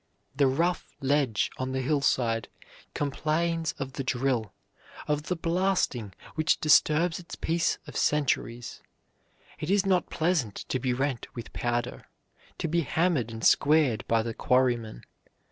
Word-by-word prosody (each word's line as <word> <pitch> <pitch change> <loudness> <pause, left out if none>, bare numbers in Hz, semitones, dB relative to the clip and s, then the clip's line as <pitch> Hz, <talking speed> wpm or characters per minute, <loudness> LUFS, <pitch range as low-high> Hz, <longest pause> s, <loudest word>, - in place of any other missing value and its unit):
The 140 0 +4
rough 170 +7 -1
ledge 135 -5 +1
on 130 0 -2
the 130 - -1
hillside 125 -5 +1 0.5
complains 160 +3 -1
of 135 -1 -6
the 135 - -3
drill, 125 -5 0 0.6
of 150 +1 -1
the 180 - 0
blasting 165 - 0 0.2
which 155 0 +1
disturbs 155 +3 +4
its 170 - -9
peace 165 +1 0
of - - -11
centuries: 120 -5 0 0.8
it 155 - -4
is 200 0 +3
not 185 -3 +2
pleasant 155 - 0
to 130 - 0
be 125 0 0
rent 130 -1 -1
with 120 - -8
powder, 120 0 -2 0.5
to - - -2
be 170 +2 +1
hammered 160 - +1
and 110 0 -5
squared 145 -6 +4
by 115 -1 +2
the 115 0 -4
quarryman. 120 - +1
140 Hz, 140 wpm, -28 LUFS, 120-165 Hz, 0.8 s, The